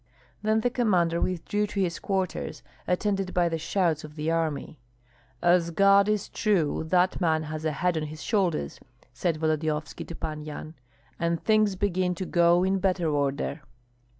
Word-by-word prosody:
Then 215 +1 +2
the 245 - +1
commander 180 -9 +2
withdrew 205 +4 -1
to 205 -1 -4
his 175 -3 0
quarters, 190 -2 -3 0.2
attended 195 0 0
by 175 -1 +3
the 165 -1 -2
shouts 165 -1 0
of 150 0 -10
the 155 +1 -1
army. 160 -3 -2 0.6
"As 175 -1 +4
God 200 +3 +5
is 210 -2 0
true, 180 -9 0
that 180 +2 +2
man 160 -2 +2
has 155 0 -5
a 155 - +1
head 175 +4 0
on 155 - -1
his 155 +1 -8
shoulders," 180 - 0 0.3
said 160 +5 -1
Volodyovski 155 -1 -1
to 170 - -7
Pan 155 -1 -5
Yan, 155 +1 -7 0.5
"and 170 -1 0
things 215 -2 +3
begin 185 -2 0
to 185 - -4
go 175 0 +4
in 190 +1 +1
better 180 -4 +1
order." 145 +1 -1
175 Hz, 165 wpm, -27 LUFS, 155-195 Hz, 0.6 s, God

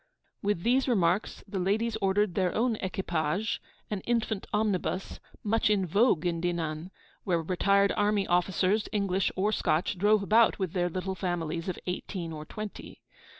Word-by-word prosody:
With 200 -4 0
these 255 +3 +3
remarks, 190 -4 +1
the 195 - -3
ladies 215 +5 0
ordered 195 0 +2
their 185 -2 0
own 235 0 +2
equipage, 185 0 -1 0.3
an 210 - -1
infant 220 -1 -1
omnibus, 205 -3 -1 0.2
much 225 +1 +2
in 200 -3 +2
vogue 185 -1 +3
in 170 -1 0
Dinan, 170 -1 -2 0.3
where 170 -4 0
retired 200 +3 +3
army 205 -1 +2
officers, 185 +3 +1
English 195 -3 +1
or 200 +3 +1
Scotch, 175 -2 0
drive 210 +1 +4
about 225 +3 +4
with 190 -4 -2
their 175 -1 +1
little 185 +2 -3
families 175 -2 -2
of 180 - -3
eighteen 180 -2 -4
or 155 0 -7
twenty. 215 +4 -8
190 Hz, 150 wpm, -29 LUFS, 175-210 Hz, 0.3 s, drive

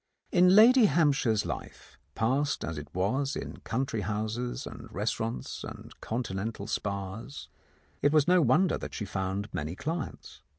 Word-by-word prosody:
In 180 0 +6
Lady 235 +3 +8
Hampshire's 140 - +2
life, - - -7 0.2
passed 135 +6 +1
as 80 -2 -4
it 75 - -9
was 130 +10 0
in - - -5
country 115 -2 -2
houses 110 +4 -3
and - - -9
restaurants 110 +3 -3
and - - -9
Continental 110 -2 -3
spas, 100 +4 -4 0.5
it 145 - +4
was 155 0 +4
no 180 0 +5
wonder 155 +7 +3
that - - -7
she 105 - -3
found 95 +1 -3
many 75 +4 -3
clients. 160 - -5
115 Hz, 140 wpm, -29 LUFS, 100-145 Hz, 0.5 s, Lady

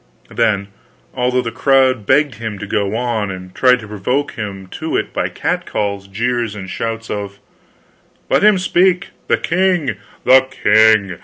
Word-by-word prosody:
Then, 100 0 0 0.4
although 125 0 0
the 115 - -4
crowd 130 -3 +2
begged 145 0 +3
him 110 -2 -4
to 100 - -6
go 100 0 -1
on, 115 -4 -1
and 90 -1 -8
tried 125 -1 +4
to 110 - -10
provoke 115 +8 -2
him 100 -3 -6
to 160 +9 -3
it - - -3
by - - -1
catcalls, 100 -1 -3
jeers, 115 +2 -2
and 95 -2 -7
shouts 115 +3 -4
of: 100 -1 -5 0.9
"Let - - +2
him 210 -2 +6
speak! 180 0 +2 0.2
The - - +2
king! 175 - 0 0.3
The 130 0 +6
king! 110 -6 +3
115 Hz, 155 wpm, -17 LUFS, 100-130 Hz, 0.9 s, him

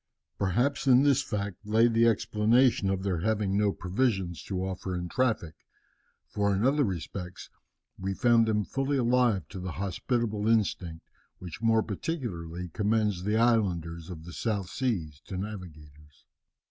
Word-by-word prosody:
"Perhaps 125 +10 0
in 130 +1 +6
this 140 -1 +4
fact 105 -6 -4
lay 110 +3 +4
the 115 0 +3
explanation 110 0 +3
of 95 -1 -1
their 95 -4 -1
having 105 0 0
no 105 0 +3
provisions 95 - -1
to 95 -1 -2
offer 95 -1 -4
in 90 0 -4
traffic, 110 -7 0 0.7
for 100 -1 0
in 100 - 0
other 145 +2 +3
respects 90 - -5 0.5
we 95 +1 -2
found 115 -1 +4
them 105 -2 +1
fully 135 +1 -1
alive 120 - +2
to 95 - -7
the 90 -2 -5
hospitable 105 +3 -2
instinct 95 -7 0 0.3
which 90 +1 -9
more 115 -1 +3
particularly 90 - -4
commends 105 0 0
the 105 +1 +1
islanders 90 -8 +1
of 80 -3 -8
the 85 - -9
southern 105 -4 -1
seas 90 - -3
to 95 - -5
navigators." 75 -8 -9
100 Hz, 145 wpm, -28 LUFS, 90-115 Hz, 0.7 s, in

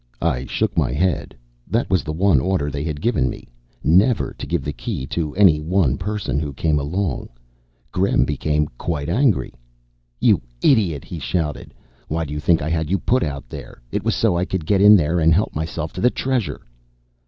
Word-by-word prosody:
I 70 -6 0
shook - - -1
my 70 -7 +1
head. 85 +1 -1 0.3
That 115 +2 0
was 95 - +2
the 80 - -4
one 90 -1 +3
order 75 -1 0
they 70 +1 -3
had 75 -2 -4
given 80 - +1
me - - -8 0.4
never 100 - +3
to - - -6
give - - -1
the 75 - -3
Key 65 - -4
to 75 +1 -3
any 90 -6 +5
one 80 -3 +1
person 105 -5 -2
who 75 -2 -4
came 75 +1 +1
alone. 80 +1 -2 0.6
Gremm 90 -9 +2
became 75 +1 0
quite 75 -3 -3
angry. 120 +3 +1 0.7
"You - - +4 0.2
idiot," 90 - +2
he 85 - -7
shouted. 75 0 -3 0.3
"Why 80 +1 -2
do 75 - -6
you 75 - -3
think 80 0 +2
I 75 - -2
had 80 -2 -1
you 95 - +2
put 125 +8 +1
out 70 -2 -3
here? - - -9
It - - -2
was - - +1
so - - +2
I 85 - +1
could 90 -3 -3
get 100 +2 +2
in 105 +1 +9
there 85 -1 +2
and 80 0 +4
help 100 - 0
myself 80 +2 -4
to - - -5
the 125 - +5
Treasure." 130 -5 -2
80 Hz, 200 wpm, -21 LUFS, 75-95 Hz, 0.7 s, in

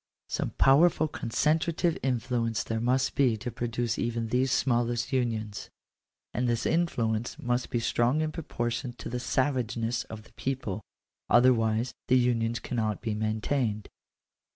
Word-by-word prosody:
Some - - -1
powerful 155 +3 +5
concentrative 160 +6 0
influence 115 -5 0
there 115 +3 -2
must 125 +3 +1
be 125 -5 +3
to 120 +3 -5
pro 120 +1 -3
duce 120 0 -1
even 115 -1 -1
th&e 130 +1 +2
smallest 120 -1 +1
unions: 110 -5 -1 0.6
and 125 +1 0
this 120 0 0
influence 120 -9 0
must 120 +1 -1
be 120 - 0
strong 120 +5 +1
in 155 0 -1
proportion 120 -6 -3
to - - -8
the 125 - -3
savageness 125 -2 0
of 110 -1 -9
the - - -21
people; 125 -6 -3 0.5
other 130 +1 +6
wise 115 +1 0
the 130 - +5
unions 120 -2 +1
cannot 110 -5 -2
be 110 - -1
maintained. 110 +1 -1
120 Hz, 145 wpm, -28 LUFS, 115-130 Hz, 0.6 s, other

